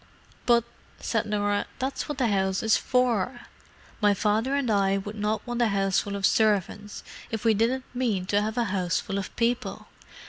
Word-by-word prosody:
"But," 235 -1 +5 0.4
said 225 -1 -1
Norah, 205 -1 0
"that's 265 +3 -3
what 295 - -3
the 255 - +1
house 190 -1 0
is 220 -1 +4
for. 245 -2 +1 0.6
My 205 -1 +4
father 220 +7 +1
and 275 -5 0
I 195 -1 +2
would 205 +2 -6
not 210 +1 -1
want 240 -1 -2
a 235 - +4
houseful 200 0 0
of 200 -1 0
servants 205 -1 +1 0.3
if 225 0 -4
we 225 - +5
didn't 240 +5 +1
mean 230 -7 0
to 205 +2 +2
have 215 +2 -3
a 240 - +3
houseful 190 -1 -1
of 195 - -7
people. 240 +1 -1
210 Hz, 175 wpm, -26 LUFS, 200-240 Hz, 0.6 s, But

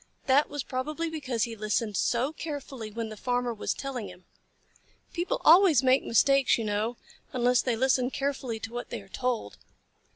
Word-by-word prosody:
That 275 +3 +4
was 290 -2 -4
probably 305 +6 -3
because 260 -8 -2
he 230 -1 -3
listened 215 0 -1
so 250 - +1
carefully 280 -8 -6
when 225 +1 -5
the 215 - -7
Farmer 245 +2 -1
was 215 - -3
telling 260 -6 -5
him. 180 0 -15 0.9
People 360 +9 -1
always 330 -5 +7
make 260 +1 +4
mistakes, 275 +3 +4
you 230 - -3
know, 215 +3 -1 0.4
unless 250 0 +3
they 245 -3 0
listen 255 +1 +2
carefully 270 -4 -3
to 225 +2 -6
what 245 - -5
they 235 - -5
are - - -18
told. 245 - -3
250 Hz, 170 wpm, -28 LUFS, 225-275 Hz, 0.9 s, always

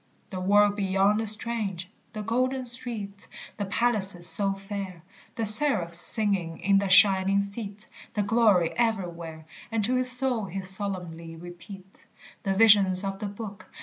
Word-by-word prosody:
The 185 - -6
world 205 +2 +2
beyond 195 +2 0
is 220 - +5
strange; 210 -5 -1 0.3
the 215 -1 -7
golden 255 +4 -2
streets, 225 -5 -9 0.3
The 205 - -4
palaces 195 -3 +1
so 195 +3 +2
fair, 195 -3 -8 0.3
The 225 - -3
seraphs 210 -7 +4
singing 190 -5 +3
in 195 0 +1
the 200 -1 -3
shining 195 0 +3
seats, 200 +1 -7 0.3
The 210 - -1
glory 205 -5 +1
everywhere, 170 -8 -4 0.3
And 225 -1 -2
to 240 +5 -1
his 255 0 +3
soul 250 -4 0
he 195 +1 -7
solemnly 180 -4 -4
repeats 175 +3 -13 0.3
The 195 -1 -3
visions 200 -3 +4
of 195 0 -5
the 210 - -5
Book. 205 0 -10
200 Hz, 150 wpm, -25 LUFS, 185-220 Hz, 0.3 s, is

